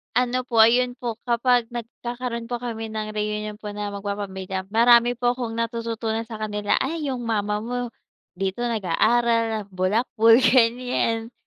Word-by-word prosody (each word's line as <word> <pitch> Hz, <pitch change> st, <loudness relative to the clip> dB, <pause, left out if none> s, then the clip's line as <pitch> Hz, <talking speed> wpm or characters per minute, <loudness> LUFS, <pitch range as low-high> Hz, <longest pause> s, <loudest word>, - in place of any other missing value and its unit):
Ano 250 Hz, 0 st, +1 dB
po, 230 Hz, -3 st, +3 dB
ayun 245 Hz, +2 st, +4 dB
po, 235 Hz, -2 st, -5 dB
kapag 240 Hz, 0 st, +2 dB
nagkakaroon 240 Hz, 0 st, -5 dB
po 240 Hz, 0 st, -4 dB
kami 225 Hz, -2 st, -4 dB
ng 215 Hz, -1 st, -4 dB
reunion 210 Hz, 0 st, -3 dB
po 210 Hz, -1 st, -7 dB
na 205 Hz, 0 st, -4 dB
mag-papamilya, 200 Hz, -2 st, -4 dB
marami 235 Hz, +2 st, +5 dB
po 245 Hz, 0 st, +1 dB
'kong 235 Hz, -2 st, -5 dB
natututunan 230 Hz, -1 st, -2 dB
sa 225 Hz, -1 st, -8 dB
kanila, 210 Hz, -1 st, -1 dB
ay 295 Hz, +1 st, -2 dB
yung 245 Hz, -2 st, -4 dB
mama 210 Hz, -2 st, 0 dB
mo 245 Hz, +2 st, -3 dB, 0.5 s
dito 195 Hz, +4 st, -2 dB
nag-aaral, 230 Hz, +1 st, +1 dB
bulakbol, 225 Hz, +4 st, +3 dB
ganyan, 240 Hz, -2 st, +2 dB
230 Hz, 140 wpm, -23 LUFS, 215-240 Hz, 0.5 s, marami